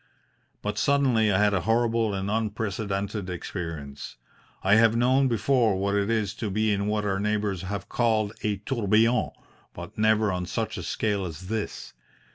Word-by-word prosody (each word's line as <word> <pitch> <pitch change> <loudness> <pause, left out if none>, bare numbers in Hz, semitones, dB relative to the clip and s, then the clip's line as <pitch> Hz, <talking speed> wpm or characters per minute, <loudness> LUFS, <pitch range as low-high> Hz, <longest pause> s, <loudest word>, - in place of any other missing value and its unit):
But - - -2
suddenly 130 -7 +3
I 95 - +3
had 105 0 +3
a 95 - +1
horrible 115 +1 +1
and 95 +1 -2
unprecedented 105 -2 -2
experience. 80 -5 -6 0.5
I 95 - +4
have 115 +1 +5
known 130 +3 +3
before 120 -2 +2
what 100 +1 0
it 100 +1 +1
is 110 -3 0
to 110 - -3
be 110 +2 +1
in 100 0 -1
what 105 0 0
our 95 -1 0
neighbours 105 -3 -1
have 95 +1 -5
called 110 -3 +1
a 105 -2 -1
tourbillon, 115 -1 +2 0.5
but - - -9
never 110 -1 +3
on 90 -1 -3
such - - -3
a - - -4
scale 105 -3 -1
as 90 +1 -7
this. 110 -1 -4
105 Hz, 165 wpm, -26 LUFS, 100-115 Hz, 0.5 s, have